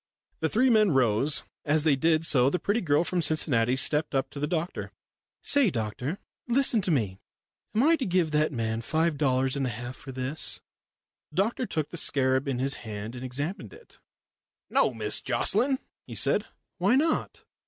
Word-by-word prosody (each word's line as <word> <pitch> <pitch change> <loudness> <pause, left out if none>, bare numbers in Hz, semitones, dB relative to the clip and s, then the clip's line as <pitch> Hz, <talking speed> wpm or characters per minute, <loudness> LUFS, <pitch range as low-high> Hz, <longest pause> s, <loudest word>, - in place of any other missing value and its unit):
The 160 - 0
three 250 +7 +3
men 215 -3 +5
rose. 135 0 +2 0.2
As 150 +1 +2
they 155 -3 +4
did 160 +3 +2
so 130 -4 +4
the 180 - 0
pretty 205 +6 0
girl 150 -1 +2
from 175 0 -1
Cincinnati 130 -6 +2
stepped 150 +2 +1
up 135 - 0
to 140 - -7
the 150 - -1
doctor. 170 +2 -3 0.5
"Say, 285 -6 +4
doctor 125 - -3 0.3
listen 245 -2 +2
to 185 - -2
me. 105 - 0 0.6
Am 225 - +3
I 325 +3 +4
to 265 - -3
give 175 -3 +1
that 155 0 +2
man 115 -3 -2
five 160 +5 0
dollars 130 -2 +1
and 135 -2 -1
a - - -1
half 120 +3 -6
for 135 - -10
this?" 130 +4 -2 0.7
The - - -18
doctor 225 +6 0
took 155 -2 -2
the 175 - -5
scarab 130 -3 +2
in 135 -3 -1
his 135 +2 +1
hand 110 0 -6
and 125 0 -8
examined 145 - -4
it. 460 +2 -17 0.7
"No, - - +3
Miss - - -1
Jocelyn," 265 +1 +1 0.3
he - - -8
said. - - +1 0.3
"Why 250 - +3
not? 310 +4 0
150 Hz, 185 wpm, -27 LUFS, 130-180 Hz, 0.7 s, men